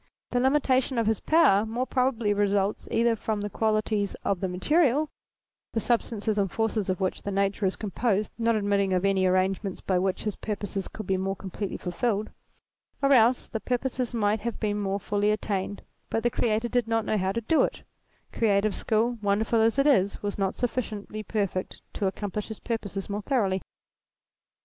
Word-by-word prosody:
The 245 - +2
limitation 260 -1 +2
of 230 - +2
his 220 0 +1
power 260 -11 +4
more 230 +3 -2
probably 250 -5 +1
results 200 0 0
either 230 0 +2
from 215 -1 -2
the 205 0 -4
qualities 215 -2 0
of 195 -2 0
the 190 - -1
material 295 - +2 0.6
the 225 - +1
substances 220 -2 0
and 195 -3 0
forces 225 -3 -1
of 185 - 0
which 190 -1 -1
the - - -4
universe 200 +1 0
is 190 -1 +1
composed 210 0 -1
not 230 -1 +1
admitting 200 -2 +1
of 185 +1 +1
any 190 -1 +3
arrangements 185 +1 0
by 185 -2 0
which 190 0 -1
his 210 -2 -2
purposes 205 -2 -4
could 215 - -8
be 190 0 +1
more 195 +1 -1
completely 195 +1 -5
fulfilled; 210 +3 -1 0.7
or 275 0 +5
else, 245 0 +4
the 225 - -4
purposes 250 +1 -2
might 215 -2 +1
have 235 +1 -4
been 210 -1 -1
more 200 0 -1
fully 205 +1 0
attained, 205 -2 -2 0.3
but 225 - -1
the 240 - +2
Creator 225 +1 0
did 245 -2 +1
not 225 -1 +1
know 215 - +1
how 190 +1 0
to 230 - -2
do 315 +8 +3
it; - - -1 0.5
creative 205 -2 +2
skill, 230 +2 0
wonderful 215 +2 +2
as 225 +3 +3
it 275 - +3
is, 205 -11 +3
was 205 0 -3
not 195 -1 0
sufficiently 215 -4 -3
perfect 200 -3 -2
to 200 - -1
accomplish 205 +1 -3
his 220 - -7
purposes 205 -4 -4
more 205 +1 -3
thoroughly. 200 -7 +1
210 Hz, 185 wpm, -27 LUFS, 195-230 Hz, 0.7 s, or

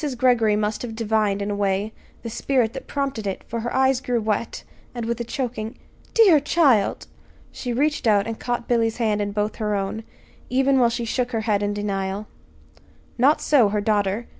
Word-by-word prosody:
Greggory 235 -4 +3
must 210 0 -1
have 230 -3 -5
divined, 215 -3 0
in 205 - -3
a - - -1
way, 200 +1 -1 0.3
the 230 - -4
spirit 240 -1 0
that - - -8
prompted 270 -7 -3
it, 195 - -4
for 230 - -5
her 240 +2 -3
eyes 265 -1 +2
grew 245 -2 0
wet, 220 +1 -2 0.3
and 235 -2 -3
with 235 +1 -2
a - - -1
choking 235 -2 -4 0.4
"Dear 390 -9 +7
child!" 275 -8 +2 0.5
she 250 - -5
reached 285 +1 0
out 205 -2 +4
and 225 -1 -5
caught 240 -1 -3
Billy's 230 -2 +1
hand 215 -3 0
in 205 0 -2
both 210 +1 -2
her 210 -2 -1
own 200 +3 -3 0.5
even 270 +1 +3
while 240 -2 +4
she 235 0 -3
shook 245 +2 -2
her 225 - 0
head 210 -2 0
in 205 0 -1
denial. 200 0 -3 0.9
Not 280 +5 +4
so 255 -8 +4
her 210 +1 0
daughter. 205 +1 0
225 Hz, 190 wpm, -23 LUFS, 210-245 Hz, 0.9 s, Dear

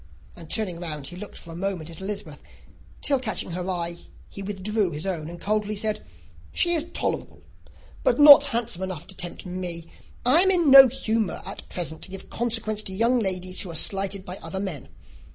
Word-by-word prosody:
and 165 -3 -12
turning 185 -6 -1
round, 155 -5 -5
he 175 - -8
looked 205 +3 -9
for 170 - -11
a - - -8
moment 180 -3 -3
at 165 +1 -11
Elizabeth, 190 -7 -6 0.6
till, 280 -2 +1
catching 220 -7 -4
her 180 +2 -4
eye, 170 -2 -2 0.4
he 200 - -8
withdrew 205 +1 -1
his 150 +1 -5
own, 165 -5 -3
and 175 0 -9
coldly 210 +2 -1
said, 215 +1 -2 0.5
"She 345 - +5
is 325 -2 +1
tolerable: - - -4 0.6
but - - +1
not 285 -1 +10
handsome 235 -7 -2
enough 185 -4 -5
to 190 - -10
tempt 175 +1 -7
me; 175 -2 -5 0.3
and 255 +5 +5
I - - +7
am 380 - +5
in 345 -6 +3
no 270 -1 +11
humour 225 -4 -2
at - - -9
present 160 -3 -5
to - - -5
give 195 0 -10
consequence 225 -2 0
to 190 - -5
young 235 +5 +3
ladies 185 -3 0
who 185 - -2
are 165 - -7
slighted 195 +3 +2
by 180 +1 -7
other 190 - -6
men. 185 -9 -5
195 Hz, 200 wpm, -25 LUFS, 175-225 Hz, 0.6 s, no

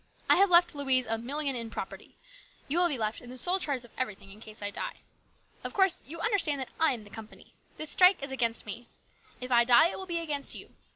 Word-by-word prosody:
I - - +5
have 395 +1 +5
left 345 0 +5
Louise 265 -3 +1
a 225 0 -2
million 280 +3 -2
in 230 -2 -4
property. - - -8 0.5
You 315 +5 +1
will 355 - +5
be 290 -6 -1
left 215 -1 -2
in 245 - -12
the 255 - -9
sole 360 +8 +1
charge 275 -8 -2
of 240 - -18
everything 205 -6 -4
in 210 +2 -15
case 215 -1 -10
I 205 - -2
die. - - -6 0.6
Of - - -5
course 385 -2 +2
you 330 +4 -7
understand 365 -10 +1
that 260 - -5
I 320 -3 +4
am 230 -4 -6
the 205 - -16
company. 220 -1 -12 0.2
This 310 -1 -4
strike 365 -4 +5
is 280 - -5
against 235 -3 -1
me. 230 +3 -8 0.5
If 250 0 -6
I 240 -1 +6
die, 245 +7 +6
it - - -6
will 380 - -7
be 345 -1 -2
against 295 -4 0
you. - - -10
265 Hz, 240 wpm, -29 LUFS, 230-335 Hz, 0.6 s, I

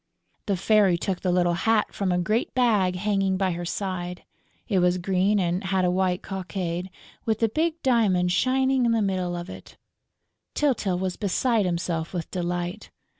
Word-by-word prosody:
The 200 -2 +1
Fairy 200 -2 +3
took 185 +1 -2
the 185 - 0
little 175 -1 +2
hat 215 +4 +1
from 195 -2 -1
a 180 - +1
great 215 +9 -1
bag 210 -8 +2
hanging 195 0 0
by 190 -1 +1
her 175 0 -4
side. 180 -1 -4 0.4
It 195 -4 +2
was 180 0 +3
green 190 +3 +1
and 180 +1 0
had 190 -1 +1
a 180 - +2
white 185 0 0
cockade, 185 -1 -4 0.4
with 220 -2 +1
the 225 - +2
big 320 +7 -1
diamond 200 -8 +2
shining 260 +3 +2
in 230 - +2
the 225 -2 +2
middle 185 -3 -1
of 175 0 -5
it. - - -11 0.8
Tyltyl 235 -11 +1
was 185 0 -3
beside 215 +1 +1
himself 170 -1 -2
with 170 - -4
delight. 175 +2 -3
190 Hz, 175 wpm, -25 LUFS, 180-215 Hz, 0.8 s, Fairy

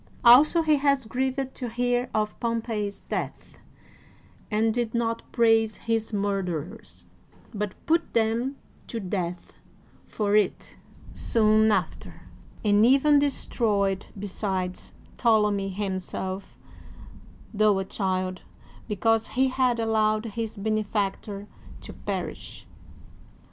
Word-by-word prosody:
Also 295 +8 +7
he 310 -2 +4
was 280 -2 +2
grieved 260 +3 -2
to 245 -2 -5
hear 245 +1 0
of 215 -1 -1
Pompey's 225 -3 -2
death - - -5 0.9
and 220 +1 +2
did 240 -1 -2
not 230 -1 0
praise 225 -2 +3
his 225 -1 -2
mur 200 -1 0
derers, 180 +3 -6 0.5
but 205 -2 -3
put 335 +1 +1
them 230 +4 +1 0.3
to 230 - -4
death 180 -3 -4 0.5
for 210 -1 0
it 210 -3 0 0.4
soon 220 -1 +3
after, - - -3 0.4
and 205 0 +4
even 275 +4 +5
destroyed 210 -8 0
besides 190 -2 -3 0.3
Ptolemy 210 -4 +2
himself, 190 -1 -4 1.0
tho 210 -1 +3
a 195 - -2
child, 185 -2 -2 0.5
because 225 +1 +1
he 265 0 +4
had 255 -2 +1
allowed 215 -1 +1
his 225 -1 -4
benefactor 205 -1 -2 0.4
to - - -9
perish. - - -6
220 Hz, 105 wpm, -26 LUFS, 200-235 Hz, 1.0 s, Also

